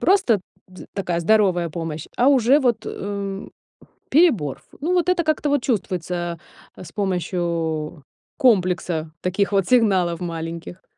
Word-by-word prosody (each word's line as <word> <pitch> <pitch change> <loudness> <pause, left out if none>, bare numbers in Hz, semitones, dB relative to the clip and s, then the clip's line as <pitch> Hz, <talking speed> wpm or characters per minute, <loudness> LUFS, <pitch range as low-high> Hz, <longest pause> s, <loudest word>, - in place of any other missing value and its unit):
просто 355 - +3 0.3
з 185 - -12
такая 175 -4 -2
здоровая 180 -3 +3
помощь, 160 -1 -5
а 250 - +4
уже 265 0 +5
вот, 240 -5 +1
э, 200 -1 -5 0.6
перебор 245 - +3
ф - - -27 0.2
Ну, 335 +5 -1
вот 355 -1 +1
это 365 -1 +3
как-то 310 -1 0
вот 285 -3 +1
чувствуется, 180 - -2 0.4
э, - - -9
с 160 - -12
помощью 170 -5 -2 0.3
комплекса 180 - +2
таких 195 +3 0
вот 195 -2 +2
сигналов 190 -9 +3
маленьких. 170 +1 -6
185 Hz, 135 wpm, -22 LUFS, 170-240 Hz, 0.6 s, уже